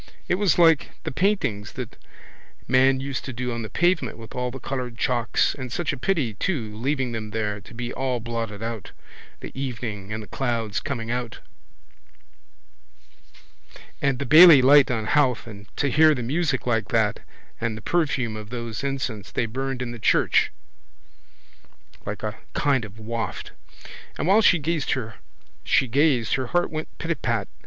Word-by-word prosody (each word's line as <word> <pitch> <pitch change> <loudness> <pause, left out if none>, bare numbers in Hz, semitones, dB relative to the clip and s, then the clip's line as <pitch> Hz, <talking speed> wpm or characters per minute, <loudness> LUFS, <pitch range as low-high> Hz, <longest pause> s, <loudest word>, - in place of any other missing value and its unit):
It - - +1
was 195 -6 +3
like 165 -4 +4
the - - -3
paintings 130 - 0
that - - -6 0.7
man 130 +1 +4
used 135 -1 -4
to 130 - -5
do 125 +1 -3
on 115 0 -3
the 110 - -6
pavement 175 -10 +1
with 115 -1 -11
all 125 0 -2
the 130 - -7
coloured 125 -2 -4
chalks 120 -2 +1
and 130 -3 -7
such 170 +2 -1
a - - -5
pity 135 - 0
too 115 - -2
leaving 130 +2 -1
them 110 -2 -5
there 105 -1 -2
to - - -16
be 120 0 -4
all 130 -2 -1
blotted 115 -2 -4
out, 115 -2 -5 0.5
the - - -7
evening 115 -7 -5
and 110 0 -4
the - - -12
clouds 115 -5 -2
coming 115 -5 -4
out 120 -1 -3 2.6
and 140 -2 +1
the 140 - -3
Bailey 155 +2 +9
light 140 +1 +7
on 110 -3 -1
Howth 130 -1 +2
and 100 -3 -11
to 145 - +1
hear 155 +2 +6
the 125 - -4
music 140 +1 0
like 115 -4 0
that - - +1 0.4
and 115 -1 -2
the - - -9
perfume 135 -9 0
of 105 -1 -8
those 115 0 -5
incense 130 -7 -3
they 120 - 0
burned 130 +2 -3
in 120 - -5
the 120 - -8
church - - +3 1.6
like - - -5
a - - -4 0.2
kind 135 -5 +2
of 105 0 -13
waft. 115 +1 -4 0.7
And - - -2
while 200 +5 +5
she 180 - +5
gazed 155 -1 -1
her 115 -4 -5 1.3
heart 175 +6 0
went 155 0 -4
pitapat. 120 - -2
125 Hz, 165 wpm, -24 LUFS, 115-140 Hz, 2.6 s, Bailey